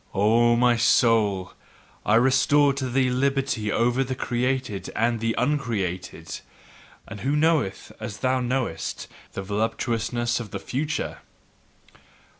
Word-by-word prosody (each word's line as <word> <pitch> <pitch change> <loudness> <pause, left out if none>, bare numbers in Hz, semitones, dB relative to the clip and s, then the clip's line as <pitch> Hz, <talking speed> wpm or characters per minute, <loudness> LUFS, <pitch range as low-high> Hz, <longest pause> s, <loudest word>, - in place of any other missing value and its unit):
O 115 +4 +4
my 120 0 +3
soul, 110 -5 +3 0.5
I 105 - +4
restored 135 +3 +4
to 130 -2 -2
thee 130 0 +2
liberty 130 -4 0
over 120 +3 +2
the 130 0 -4
created 125 -4 -2
and 115 +1 +1
the 115 0 -1
uncreated; 115 -10 -2 0.7
and 110 -2 -8
who 140 +3 0
knoweth, 150 -9 +1
as 105 - -6
thou 130 +2 +1
knowest, 125 -10 -2 0.3
the 95 - -4
voluptuousness 115 +3 -1
of 115 -3 -7
the 100 - -5
future? 150 +8 -3
120 Hz, 120 wpm, -25 LUFS, 110-130 Hz, 0.7 s, O